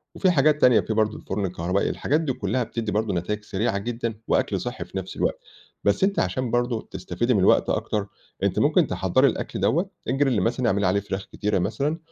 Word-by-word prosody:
وفي 185 Hz, -, +3 dB
حاجات 150 Hz, -1 st, +3 dB
تانية، 125 Hz, -3 st, +6 dB
في 110 Hz, -, -2 dB
برضو 110 Hz, 0 st, +1 dB
الفرن 100 Hz, +1 st, -3 dB
الكهربائي، 90 Hz, +1 st, -1 dB
الحاجات 150 Hz, +3 st, 0 dB
دي 145 Hz, -5 st, -1 dB
كلّها 115 Hz, +3 st, -1 dB
بتدّي 115 Hz, -1 st, -4 dB
برضو 105 Hz, 0 st, 0 dB
نتايج 105 Hz, +5 st, -2 dB
سريعة 105 Hz, 0 st, -1 dB
جدًا، 115 Hz, +2 st, -3 dB
وأكْل -, -, +1 dB
صحّي -, -, -5 dB
في -, -, -8 dB
نَفس -, -, -5 dB
الوقت، -, -, 0 dB, 0.4 s
بس 100 Hz, -, +2 dB
أنتِ 200 Hz, +1 st, +2 dB
علشان 115 Hz, +7 st, -1 dB
برضو 120 Hz, -2 st, 0 dB
تستفيدي 95 Hz, +6 st, -2 dB
من 105 Hz, -, +2 dB
الوقت 95 Hz, -, +4 dB
أكتر، 105 Hz, -2 st, -1 dB, 0.4 s
أنتِ -, -, +1 dB
ممكن -, -, +3 dB
تحضّري -, -, +2 dB
الأكْل -, -, -3 dB
دوّة، 170 Hz, -, +1 dB, 0.2 s
الgrill 135 Hz, -3 st, +2 dB
مثلًا 120 Hz, +5 st, 0 dB
اعملي 100 Hz, -3 st, +2 dB
عليه 95 Hz, +2 st, +2 dB
فراخ 95 Hz, -1 st, -5 dB
كتيرة 105 Hz, -2 st, 0 dB
مثلًا، 140 Hz, -, -1 dB
110 Hz, 200 wpm, -24 LUFS, 100-130 Hz, 0.4 s, تانية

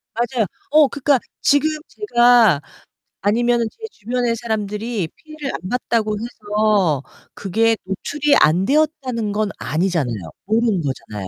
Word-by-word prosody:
맞아요. 235 Hz, -1 st, 0 dB, 0.3 s
어 300 Hz, -1 st, +6 dB
그니까 280 Hz, 0 st, +1 dB, 0.2 s
지금 285 Hz, +2 st, +3 dB, 0.2 s
제가 240 Hz, -, +4 dB, 0.6 s
아니면은 235 Hz, +3 st, +2 dB
제 445 Hz, -1 st, -9 dB
주변의 240 Hz, +2 st, -2 dB
사람들이 220 Hz, -3 st, -3 dB
피해를 310 Hz, -3 st, -7 dB
안 185 Hz, -, -6 dB
봤다고 225 Hz, -3 st, 0 dB
해서 210 Hz, -, 0 dB, 0.3 s
그게 225 Hz, +4 st, +1 dB
노출이 285 Hz, +10 st, 0 dB
안 175 Hz, +5 st, +4 dB
되었다는 270 Hz, -7 st, 0 dB
건 210 Hz, 0 st, 0 dB
아니잖아요. 160 Hz, -5 st, -1 dB, 0.3 s
모르는 220 Hz, -3 st, +1 dB
거잖아요. 105 Hz, -8 st, -5 dB
225 Hz, 295 characters per minute, -20 LUFS, 200-250 Hz, 0.6 s, 어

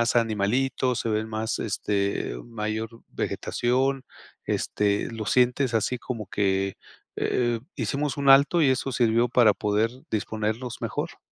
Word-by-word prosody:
animalitos? 120 Hz, +3 st, +1 dB
¿Se 115 Hz, -, -2 dB
ve 110 Hz, 0 st, 0 dB
más, 110 Hz, +1 st, -3 dB
este, 100 Hz, -, -1 dB
mayor 110 Hz, -1 st, -3 dB, 0.2 s
vegetación? 130 Hz, +2 st, -1 dB, 0.4 s
Este, 100 Hz, -1 st, 0 dB
¿lo 110 Hz, -2 st, -5 dB
sientes 125 Hz, +2 st, +2 dB
así 115 Hz, +3 st, +1 dB
como 115 Hz, -4 st, -5 dB
que 95 Hz, -1 st, 0 dB, 0.4 s
eh 120 Hz, -2 st, 0 dB, 0.2 s
hicimos 135 Hz, +3 st, -1 dB
un 140 Hz, -1 st, +2 dB
alto 140 Hz, +5 st, +6 dB
y 145 Hz, -, +5 dB
eso 130 Hz, +1 st, 0 dB
sirvió 120 Hz, 0 st, +3 dB
para 115 Hz, -3 st, +5 dB
poder 105 Hz, +3 st, 0 dB, 0.2 s
disponernos 110 Hz, +3 st, -2 dB
mejor? -, -, -4 dB
115 Hz, 125 wpm, -26 LUFS, 105-125 Hz, 0.4 s, alto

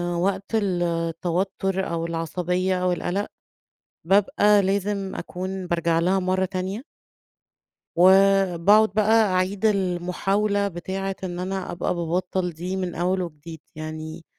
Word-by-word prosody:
وقت 195 Hz, +4 st, -1 dB
التوتُّر، 180 Hz, 0 st, -1 dB
أو 165 Hz, 0 st, -2 dB
العصبية، 180 Hz, +3 st, -1 dB
أو 180 Hz, -, +2 dB
القَلَق، 180 Hz, +3 st, -2 dB, 0.8 s
بابقى 205 Hz, +2 st, +4 dB
لازم 195 Hz, 0 st, -1 dB
أكون 185 Hz, +1 st, -5 dB
بارجع 170 Hz, -1 st, +1 dB
لها 185 Hz, +3 st, +2 dB
مرّة 185 Hz, 0 st, 0 dB
تانية. 190 Hz, +5 st, -4 dB, 1.1 s
وباقعد 195 Hz, +2 st, +5 dB
بقى 220 Hz, +2 st, +4 dB
أعيد 190 Hz, +3 st, 0 dB
المحاولة 195 Hz, +1 st, 0 dB
بتاعة 190 Hz, +1 st, -4 dB
إن 175 Hz, -1 st, -4 dB
أنا 190 Hz, +1 st, -3 dB
أبقى 175 Hz, +1 st, -2 dB
بابطّل 180 Hz, +1 st, -1 dB
دي 180 Hz, +4 st, -4 dB
من 185 Hz, -2 st, -3 dB
أول 185 Hz, +2 st, 0 dB
وجديد. 160 Hz, -1 st, -8 dB, 0.2 s
يعني 155 Hz, +1 st, -7 dB
185 Hz, 115 wpm, -24 LUFS, 175-195 Hz, 1.1 s, وباقعد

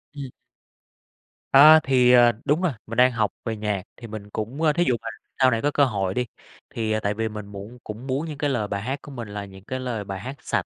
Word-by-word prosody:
Ừm. 140 Hz, -3 st, -7 dB, 1.2 s
A, 155 Hz, +3 st, +9 dB
thì, 125 Hz, -2 st, +4 dB
à, 120 Hz, -1 st, +6 dB
đúng 150 Hz, +5 st, +2 dB
rồi. 180 Hz, -3 st, +1 dB, 0.2 s
Mình 115 Hz, +1 st, -6 dB
đang 125 Hz, +1 st, +6 dB
học 120 Hz, -3 st, 0 dB
về 115 Hz, -2 st, -2 dB
nhạc, 105 Hz, -3 st, -2 dB
thì 115 Hz, -, -9 dB
mình 105 Hz, -2 st, -8 dB
cũng 110 Hz, +8 st, -5 dB
ơ, 155 Hz, -2 st, +3 dB
thí 175 Hz, -, +2 dB
dụ 125 Hz, -, +3 dB
mà -, -, -8 dB, 0.3 s
sau 130 Hz, -1 st, +5 dB
này 115 Hz, -1 st, 0 dB
có 145 Hz, -, +1 dB
cơ 145 Hz, -1 st, +4 dB
hội 100 Hz, -6 st, -1 dB
đi, 125 Hz, +4 st, -1 dB, 0.4 s
thì 110 Hz, -1 st, -2 dB
tại 100 Hz, -, 0 dB
vì 110 Hz, +1 st, -2 dB
mình 105 Hz, -1 st, -7 dB
muộn 100 Hz, +4 st, -9 dB
cũng 110 Hz, +5 st, -8 dB
muốn 135 Hz, +4 st, -1 dB
những 150 Hz, -2 st, -6 dB
cái 145 Hz, 0 st, 0 dB
lời 110 Hz, -6 st, -1 dB
bài 100 Hz, 0 st, -3 dB
hát 130 Hz, +6 st, -3 dB
của 145 Hz, -, -11 dB
mình 120 Hz, -4 st, -7 dB
là 105 Hz, 0 st, -6 dB
những 95 Hz, -1 st, -14 dB
cái 130 Hz, +5 st, -5 dB
lời 120 Hz, -5 st, -3 dB
bài 95 Hz, -1 st, -6 dB
hát 130 Hz, +8 st, -7 dB
sạch -, -, -1 dB
120 Hz, 255 wpm, -24 LUFS, 105-135 Hz, 1.2 s, A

